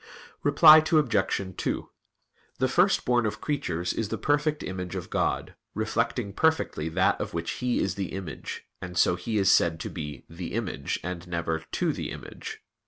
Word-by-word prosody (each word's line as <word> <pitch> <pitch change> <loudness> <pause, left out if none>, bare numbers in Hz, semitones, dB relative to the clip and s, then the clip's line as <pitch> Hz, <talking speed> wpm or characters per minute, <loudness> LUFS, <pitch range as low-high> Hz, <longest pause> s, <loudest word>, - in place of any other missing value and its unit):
Reply 155 +2 +8
Obj. 145 -13 +2 0.2
2: - - -2 0.7
The 130 - +2
First 180 +8 +3
Born 120 -2 +3
of 105 - -4
creatures 90 - -2
is 110 -2 -2
the - - -2
perfect 150 +1 +1
Image 90 -1 -5
of - - -6
God, - - 0 0.2
reflecting 115 0 -1
perfectly 160 - +1
that 95 +3 +2
of - - -4
which 85 0 -2
He 125 -1 +1
is 95 - 0
the 95 -1 -4
Image, 90 -9 -6 0.2
and 90 -1 -6
so 90 - +4
He 105 +5 -3
is 95 -1 +4
said 80 -1 +3
to - - -5
be 75 -6 -6
the 85 +1 -7
"Image," 105 -11 -2
and 90 0 -5
never 85 -2 -1
"to - - +1
the - - -4
image." - - -8
95 Hz, 170 wpm, -27 LUFS, 85-125 Hz, 0.7 s, Reply